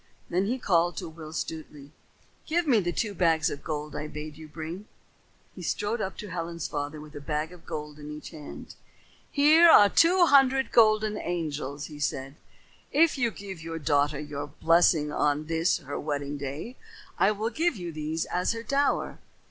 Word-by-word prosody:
Then 185 +3 +1
he 250 +4 0
called 175 -7 +1
to - - -4
Will 160 -1 -10
Stutely. 150 -3 -6 0.6
"Give 345 +2 +1
me 250 -7 +4
the 175 -3 -1
two 210 +2 -2
bags 165 -4 +2
of 145 - -7
gold 150 -1 -4
I 150 - -4
bade 150 0 -7
you 160 0 -11
bring." 165 +6 -7 0.7
He - - -10
strode 215 +2 -2
up 190 - -4
to 210 - -7
Ellen's 170 -2 -4
father 145 +1 -4
with 150 0 -12
a 145 - -7
bag 150 +2 -2
of 180 - -16
gold 150 0 -6
in 150 0 -8
each 150 0 -8
hand. 150 -3 -10 0.6
"Here 310 +4 +6
are 205 -9 +8
two 350 - +5
hundred 270 -3 +4
golden 215 -2 +4
angels," 150 -4 -3
he 150 -2 -10
said. 135 -1 -2 0.6
"If 325 +2 +4
you 240 -2 +2
give 195 -5 -9
your 165 0 -5
daughter 145 -1 +1
your 145 -1 -5
blessing 160 0 +3
on 150 +1 +1
this 165 +2 +1
her 145 -4 -6
wedding 145 -1 -3
day, 145 - -6 0.4
I 195 - +5
will 215 +2 -1
give 330 0 +1
you 175 -4 -5
these 155 +1 -3
as 180 +5 0
her 230 0 -6
dower. 280 +4 0
165 Hz, 180 wpm, -27 LUFS, 150-210 Hz, 0.7 s, are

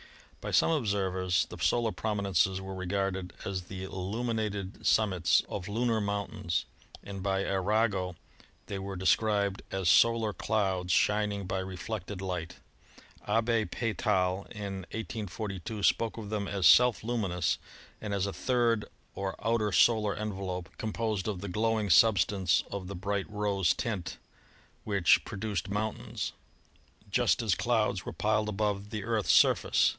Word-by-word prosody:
By - - -4
some - - +4
observers 95 - +1
the - - -10
solar 120 -2 +2
prominences 100 -3 0
were 95 0 -6
regarded 95 -1 -2
as 95 -2 -3
the 95 0 -7
illuminated 100 +1 -3
sum 110 -2 +4
mits 90 -2 +3
of 95 -1 -5
lunar 115 +1 0
mountains, 100 -4 -2 0.4
and 100 -1 -7
by 95 0 0
Arago 100 -1 0 0.5
they 100 - -5
were 95 0 -5
de 95 +1 -6
scribed 100 -1 +2
as 95 -2 -2
solar 115 +1 +4
clouds 95 -5 0
shining 105 -1 +2
by 95 +1 -2
reflected 95 +1 -5
light. 90 -3 -4 0.7
Abbe 115 +1 +2
Peytal, 100 -5 0
in 100 -2 -5
1842, 105 -2 -5
spoke 115 +2 +2
of 105 -2 -7
them 105 -2 -2
as 100 -3 -1
self 120 +7 +6
luminous 100 -7 0 0.4
and 105 - -4
as 100 -1 0
a 100 - -3
third 120 -4 +1 0.3
or 95 -1 -3
outer 115 -2 +1
solar 105 0 +4
envelope 95 -4 -4
composed 110 -3 -2
of 100 -4 -3
the 100 - -5
glowing 110 +1 0
substance 100 -1 +4
of 100 -2 -4
the 100 - -6
bright 100 +2 -2
rose 100 -4 +1
tint 105 -7 -3 0.7
which 100 -5 +4
produced 105 0 -4
moun 105 +2 -1
tains, - - -5 0.8
just 120 +2 +2
as 105 -4 +2
clouds 110 -3 +1
were - - -2
piled 105 0 +1
above 105 -1 -1
the 105 -2 -4
Earth's 110 -1 +1
surface. - - +4
100 Hz, 140 wpm, -30 LUFS, 95-110 Hz, 0.8 s, self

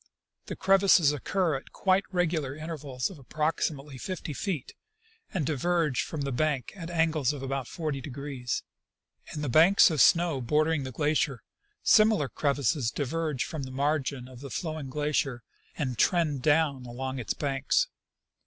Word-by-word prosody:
The - - -4
crevasses 190 -5 +5
occur 160 +3 0
at - - -13
quite 190 0 +2
regular 165 -7 0
intervals 150 -3 -4
of 170 - -12
approximately 145 -1 -2
fifty 180 -3 -5
feet, 160 -2 -4 0.6
and 170 -6 -1
diverge 155 -1 +1
from 155 - -5
the 140 -1 -2
bank 135 -2 -1
at 170 -3 -7
angles 160 -5 +1
of 140 -2 -7
about 135 -2 -3
40°. 140 -4 -4 0.7
In 150 - -4
the - - -1
banks 165 +8 +6
of 155 -5 +2
snow 170 -5 +4
bordering 150 +3 +1
the 130 - -5
glacier 145 -1 0 0.4
similar 215 - +5
crevasses 140 -2 0
diverge 150 0 -2
from 160 -3 -5
the 130 - -5
margin 140 -2 -1
of 130 -2 -12
the 140 +1 -8
flowing 155 -4 -4
glacier 140 -4 -1 0.3
and 130 -7 -2
trend 155 -6 +2
down 145 -3 +2
along 130 +2 -4
its 110 -4 -2
banks. 140 - +1
145 Hz, 145 wpm, -28 LUFS, 135-160 Hz, 0.7 s, banks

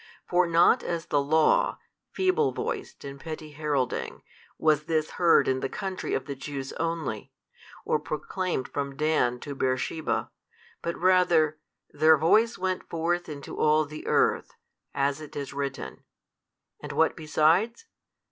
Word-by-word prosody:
For 180 0 +3
not 170 +8 +5
as 170 -2 -3
the 145 -2 +1
Law, 160 - +3 0.3
feeble 380 +4 +1
voiced - - -5
and 140 0 -8
petty 155 0 -7
heralding, 145 -4 -2 0.3
was 155 -1 +2
this 155 -1 0
heard 170 -5 +4
in 130 0 +1
the 135 - -3
country 190 -3 -3
of 135 - -3
the 140 - -4
Jews 135 0 -6
only, 165 -10 -3 0.5
or 150 - +1
proclaimed 155 0 -3
from 140 -1 -4
Dan 150 -5 +1
to 145 - -6
Beersheba, 130 +4 -1 0.5
but 170 - -3
rather, 175 -4 +3 0.3
Their 155 +1 +5
voice 220 +10 +3
went 185 0 -3
forth 170 +1 -1
into 140 -2 -7
all 155 0 +4
the 150 +1 -9
earth, - - +1 0.4
as 140 +2 0
it 155 - -10
is 140 -2 -5
written. 140 -1 -5 0.8
And - - -6
what - - +2
besides? 165 - +2
155 Hz, 140 wpm, -27 LUFS, 140-170 Hz, 0.8 s, not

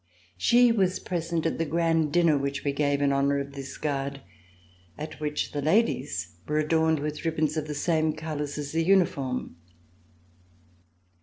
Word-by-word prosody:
She 240 - +5
was 190 -5 +2
present 170 -2 -3
at 165 - -1
the - - +2
grand 165 -1 +1
dinner 170 -2 +4
which 140 0 -2
we 140 - +1
gave 145 0 +1
in 140 -1 +3
honor 140 +1 +2
of 140 0 -4
this 135 -1 -7
Guard, 140 -2 -3 0.8
at 155 +1 -7
which 150 -1 -2
the 145 - -3
ladies 140 - 0
were 150 - 0
adorned 160 +1 +2
with 150 +1 -4
ribbons 155 -2 0
of 155 -1 -2
the 150 - -4
same 155 0 +1
colors 150 -2 -4
as 145 -1 -4
the 165 +1 +1
uniform. 145 - +1
150 Hz, 160 wpm, -27 LUFS, 140-165 Hz, 0.8 s, She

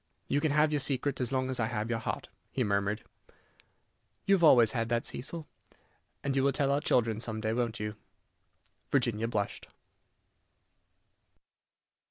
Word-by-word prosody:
"You 145 - +1
can 155 - +1
have 150 +1 +3
your 150 - +2
secret 135 0 +1
as 125 - -1
long 130 -1 0
as 130 - -2
I 110 - +1
have 110 0 -3
your 115 - 0
heart," - - -4 0.2
he 130 - 0
murmured. 100 0 0 1.2
"You 200 - +4
have 185 -3 +3
always 120 -8 +7
had 115 -2 -2
that, 120 0 0
Cecil." 155 +5 -1 0.8
"And 140 -1 -1
you 135 - +2
will 140 - +3
tell 140 0 +1
our 140 +1 +1
children 115 -5 +1
some 110 -2 -2
day, 110 0 -1
won't 120 -2 -1
you?" 105 0 -4 1.0
Virginia 120 -5 +1
blushed. 105 -3 -3
120 Hz, 160 wpm, -30 LUFS, 110-140 Hz, 1.2 s, always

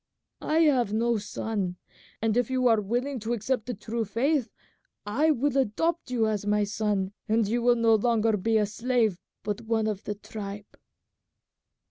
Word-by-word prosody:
I 315 +2 +2
have 260 -9 +3
no 230 +1 +1
son, 205 -3 -3 0.5
and 225 -1 +2
if 245 -1 +1
you 255 -1 +2
are 225 -2 +4
willing 245 +6 -2
to 225 +2 -2
accept 240 +1 -1
the 245 - -3
true 220 +3 -3
faith 245 +4 0 0.6
I 265 +10 +2
will 285 -1 +1
adopt 275 +6 0
you 240 -3 +1
as 215 -2 -1
my 210 0 +2
son, 205 -2 -1 0.2
and 220 -1 +2
you 235 +3 0
will 240 0 +4
be 230 - -3
no 225 -1 +5
longer 225 0 +2
a 215 +1 +2
slave 225 -2 0 0.2
but 205 -1 -3
one 225 -1 0
of 210 -2 -3
the 210 - -3
tribe." 205 0 -8
225 Hz, 170 wpm, -27 LUFS, 210-245 Hz, 0.6 s, no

